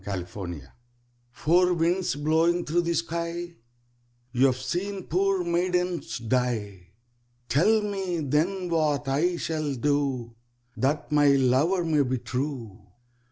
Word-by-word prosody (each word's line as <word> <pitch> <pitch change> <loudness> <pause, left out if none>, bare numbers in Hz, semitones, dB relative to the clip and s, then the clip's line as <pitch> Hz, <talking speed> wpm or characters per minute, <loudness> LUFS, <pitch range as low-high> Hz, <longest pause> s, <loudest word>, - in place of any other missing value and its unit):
Four 95 0 -5
Winds 85 -4 -7 0.7
"Four 175 +8 +3
winds 175 0 +1
blowing 160 +4 +2
thro' 175 +3 +1
the 170 0 -1
sky, 170 +1 -3 0.8
You 130 +2 +4
have 130 -1 0
seen 195 +6 -3
poor 190 +2 +1
maidens 180 0 -1
die, 110 -6 -2 0.6
Tell 210 - +3
me 190 -5 -2
then 165 +7 0
what 150 -4 +1
I 165 +6 +1
shall 155 -4 -2
do 135 -3 -1 0.4
That 145 +3 -1
my 145 -1 +4
lover 140 +7 +3
may 155 -3 +2
be 130 -1 0
true." 125 -5 -4
155 Hz, 120 wpm, -26 LUFS, 130-175 Hz, 0.8 s, You